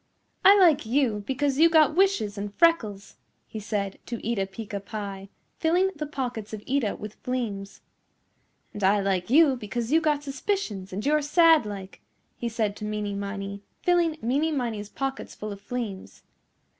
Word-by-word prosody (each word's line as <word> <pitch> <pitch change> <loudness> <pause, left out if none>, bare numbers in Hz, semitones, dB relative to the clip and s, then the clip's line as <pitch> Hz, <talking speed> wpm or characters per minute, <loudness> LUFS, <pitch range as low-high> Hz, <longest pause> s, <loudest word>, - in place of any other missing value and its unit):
"I 395 +2 +8
like 330 -6 +5
you 230 -5 +1
because 275 +1 0
you 330 +1 +7
got 310 -2 +4
wishes 355 - +2
and 205 0 -5
freckles," 220 - +1 0.3
he 220 - -7
said 200 -2 -3
to 235 - -3
Eeta 210 -4 0
Peeca 205 0 -6
Pie, 200 -1 -7 0.3
filling 360 +4 +2
the 300 0 -4
pockets 245 -7 -4
of 210 -1 -6
Eeta 255 -6 0
with 210 0 -9
fleems. 220 -6 -4 0.9
"And 205 - -6
I 200 +2 +4
like 190 -2 -1
you 285 0 +6
because 235 +1 -4
you 325 +1 +4
got 300 -2 +1
suspicions 270 - -3
and 200 +5 -4
you're 300 +1 +3
sad 320 -3 +5
like," 195 -2 -8 0.3
he 235 - -3
said 215 -3 -1
to - - -8
Meeney 210 -1 -3
Miney 200 0 -5 0.2
filling 345 -3 +3
Meeney 285 +7 +1
Miney's 230 -7 -3
pockets 270 +2 -4
full 215 0 -6
of 200 -1 -8
fleems. 210 -3 -6
230 Hz, 165 wpm, -26 LUFS, 205-295 Hz, 0.9 s, I